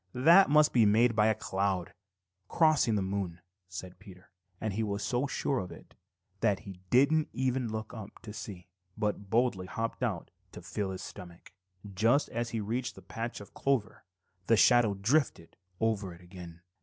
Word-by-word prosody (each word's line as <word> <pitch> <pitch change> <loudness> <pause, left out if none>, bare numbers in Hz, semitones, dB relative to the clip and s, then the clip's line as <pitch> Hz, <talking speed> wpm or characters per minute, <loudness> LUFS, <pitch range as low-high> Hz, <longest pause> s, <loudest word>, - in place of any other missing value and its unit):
"That 165 +9 +6
must 150 +1 +5
be 120 - +5
made 115 +3 +4
by 105 0 +4
a 110 - +3
cloud 95 -3 -2 0.5
crossing 155 -9 +3
the 100 - 0
moon," 95 -3 -3 0.3
said 95 -1 -8
Peter, 90 -3 -15 0.3
and 110 -2 -2
he 110 - -1
was 100 -1 -2
so 125 +5 0
sure 135 -1 -1
of 90 - -6
it - - -13 0.5
that 105 -3 +1
he 95 -4 -10
didn't 140 +5 +4
even 125 -1 -1
look 110 0 -5
up 110 -4 -9
to 105 - -8
see, 95 -5 -8 0.3
but 105 -1 -2
boldly 110 -5 +1
hopped 115 +8 -4
out 105 -9 -2 0.2
to - - -9
fill 95 +4 -3
his 95 -1 -6
stomach. 85 -1 -11 0.4
Just 115 +9 +2
as 120 0 -3
he 115 - -3
reached 120 +5 -3
the - - -13
patch 115 +1 -5
of 100 - -13
clover, 135 -6 -1 0.4
the 115 - +5
shadow 120 -3 +5
drifted 110 - 0 0.2
over 105 -5 -1
it 85 - -17
again. 90 -2 -11
110 Hz, 175 wpm, -30 LUFS, 95-120 Hz, 0.5 s, That